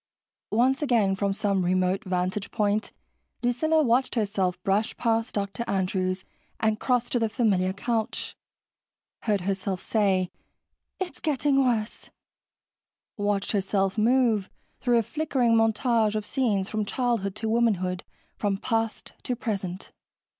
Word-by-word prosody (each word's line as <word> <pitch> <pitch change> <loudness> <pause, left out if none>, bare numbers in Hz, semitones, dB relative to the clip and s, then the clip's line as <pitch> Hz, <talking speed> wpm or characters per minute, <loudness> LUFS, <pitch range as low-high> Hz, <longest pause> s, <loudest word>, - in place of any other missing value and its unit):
Once 255 +5 +2
again, 230 -9 +2
from 200 +1 0
some 195 -2 0
remote 185 +1 +1
vantage 185 +2 -1
point, 210 -1 0 0.5
Lucilla 310 +6 +2
watched 255 +1 +2
herself 195 -5 0
brush 205 +3 0
past 225 0 0
Dr. 200 +3 -2
Andrews 185 -1 -1 0.3
and 220 -1 +1
cross 245 -2 +1
to 245 - +2
the 225 -1 +1
familiar 200 -6 +2
couch, 220 +3 -2 0.9
heard 205 -4 +2
herself 190 0 -2
say, 190 -4 +1 0.7
"It's 370 -2 -4
getting 280 -2 +2
worse," 230 -4 -1 1.1
watched 205 -1 0
herself 195 -1 +1
move 225 -3 +3 0.3
through 245 -2 +3
a 230 - +3
flickering 265 -3 +1
montage 225 -1 +2
of 215 -1 -2
scenes 210 -8 0
from 215 0 -1
childhood 225 -3 -1
to 225 - -3
womanhood, 200 -6 +1 0.3
from 200 -2 0
past 225 +2 -2
to 250 - -2
present. 195 -5 -4
215 Hz, 125 wpm, -26 LUFS, 195-235 Hz, 1.1 s, move